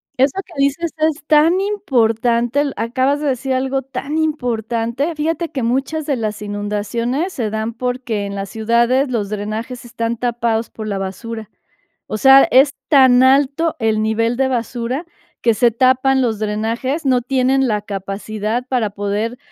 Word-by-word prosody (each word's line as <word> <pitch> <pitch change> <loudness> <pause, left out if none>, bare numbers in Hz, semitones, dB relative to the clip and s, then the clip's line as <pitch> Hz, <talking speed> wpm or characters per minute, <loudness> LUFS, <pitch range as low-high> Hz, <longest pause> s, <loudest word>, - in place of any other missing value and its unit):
Eso 270 +7 +2
que 350 - -16
dices 280 +4 0
es 310 -1 0
tan 315 +4 +4
importante, 240 - +1
l 290 -1 -1
acabas 260 +6 0
de 300 - -2
decir 265 0 -1
algo 265 +1 -1
tan 270 +4 -4
importante. 245 -2 -1
Fíjate 325 +2 -2
que 265 - -4
muchas 270 +6 -1
de 285 - +1
las 215 -3 -3
inundaciones 210 - -2
se 220 -4 -2
dan 220 +1 -3
porque 245 -3 -3
en 200 - -5
las 195 -1 -5
ciudades 235 +5 +1
los 210 -5 -1
drenajes 215 +4 -5
están 230 0 -3
tapados 235 -1 -1
por 215 -1 -7
la 200 -2 -2
basura. 215 +3 -6 0.6
O - - -3
sea, 270 +4 +7
es 270 +2 +6 0.2
tan 260 -4 +6
alto 280 +5 +3
el 220 -2 +1
nivel 230 +2 0
de 265 -1 +2
basura 245 +3 -2 0.4
que 230 -2 +3
se 235 +1 +3
tapan 260 +2 +3
los 225 -4 0
drenajes, 225 +8 -2
no 255 -2 +3
tienen 265 +1 +1
la 210 -3 0
capacidad 210 +3 -4
para 245 -5 0
poder, 205 +4 -3
245 Hz, 160 wpm, -18 LUFS, 220-270 Hz, 0.6 s, sea